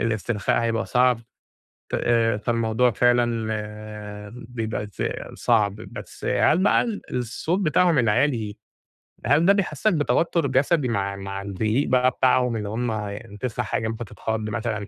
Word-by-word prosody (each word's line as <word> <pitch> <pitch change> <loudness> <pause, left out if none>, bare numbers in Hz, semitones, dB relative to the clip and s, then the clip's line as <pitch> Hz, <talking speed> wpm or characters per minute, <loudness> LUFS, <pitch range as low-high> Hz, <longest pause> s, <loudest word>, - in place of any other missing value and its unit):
الإسترخاء 110 -1 0
هيبقى 115 0 0
صعب 125 -1 +3 0.7
ت - - -1
آآ 115 -2 +2
فالموضوع 115 +2 +1
فعلًا 120 -1 +2 1.0
بيبقى 110 -3 -3
ز 105 - -6 0.3
صعب، 105 -4 +2
بس 110 - -10
هل 160 - +3
بقى - - +4
ال 230 -4 -3 0.2
الصوت 125 - -1
بتاعهم 175 -2 +3
العالي، 115 -2 +1 0.7
هل 155 +4 +4
ده 195 - +6
بيحسّسك 200 0 +1
بتوتُّر 155 +2 +1
جسدي 135 +2 +2
مع 100 -3 -1
مع 95 0 -5
الزعيق 110 +7 -1
بقى 130 0 +4
بتاعهم 125 -1 +2
إن 105 -2 -3
هُم 105 -1 -4
تسمَع 120 0 -3
حاجة 110 +2 -1
ممكن 115 +1 -4
بتتخَض 110 +1 -4
مثلًا 105 -1 -3
115 Hz, 135 wpm, -24 LUFS, 110-130 Hz, 1.0 s, ده